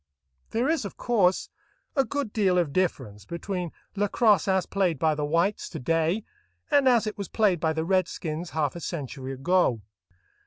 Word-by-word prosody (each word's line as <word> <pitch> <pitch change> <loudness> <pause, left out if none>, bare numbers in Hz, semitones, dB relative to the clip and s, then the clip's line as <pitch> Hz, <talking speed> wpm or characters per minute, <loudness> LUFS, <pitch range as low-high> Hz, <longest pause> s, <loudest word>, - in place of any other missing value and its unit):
There 235 +4 0
is, 320 -3 +1
of 200 - -7
course, 200 -7 +2 0.5
a 270 - +4
good 265 -2 -3
deal 190 -4 +2
of 165 -6 +1
difference 130 - -1
between 175 - -4 0.2
lacrosse 205 -1 +3
as 190 -2 +2
played 185 -5 0
by 160 +2 +2
the 150 0 -3
whites 170 +7 0
to - - -6
day 165 - +1 0.5
and 285 -2 +5
as 235 -3 +4
it 215 0 -5
was 200 - -3
played 205 -6 +2
by 160 -1 +1
the 160 0 -2
redskins 175 -2 -1
half 150 -2 -1
a - - -5
century 135 -5 -5
ago. 135 - +1
180 Hz, 170 wpm, -26 LUFS, 160-210 Hz, 0.5 s, and